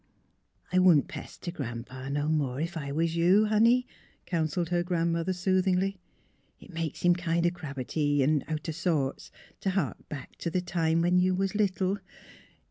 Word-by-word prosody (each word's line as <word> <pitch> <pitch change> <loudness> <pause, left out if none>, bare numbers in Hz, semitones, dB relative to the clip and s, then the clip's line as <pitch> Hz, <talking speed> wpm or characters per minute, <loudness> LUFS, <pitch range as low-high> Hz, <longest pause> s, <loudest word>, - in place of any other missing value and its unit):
*'I 185 - +4
wouldn't 175 -6 +5
pester 175 - -7
Gran 120 -8 -5
'pa 130 +2 -8
no 145 +1 -1
more, 140 -5 0
ef 170 +3 -3
I 140 -3 -4
was 165 +3 0
you, 180 +6 +5
honey," 230 +4 +4 0.4
counseled 165 0 -1
her 175 -1 +1
grandmother 170 0 0
sooth 185 +1 +1
ingly. 190 +1 +1 0.3
" - - -40
It 190 - -14
makes 165 -2 -4
him 175 0 +6
kind 170 -1 0
o' 175 - +3
crabbity 145 -3 -1
an' 145 0 +2
out 155 0 -4
o' - - -1
sorts 155 -5 -1 0.3
t' 195 - -1
hark 185 -7 -2
back 140 -4 -8
t' 170 - -2
th' 180 +2 -1
time 165 -2 +1
when 180 +1 +4
you 185 0 +2
was 195 +1 -1
little. 200 -1 0
170 Hz, 180 wpm, -28 LUFS, 150-185 Hz, 0.4 s, him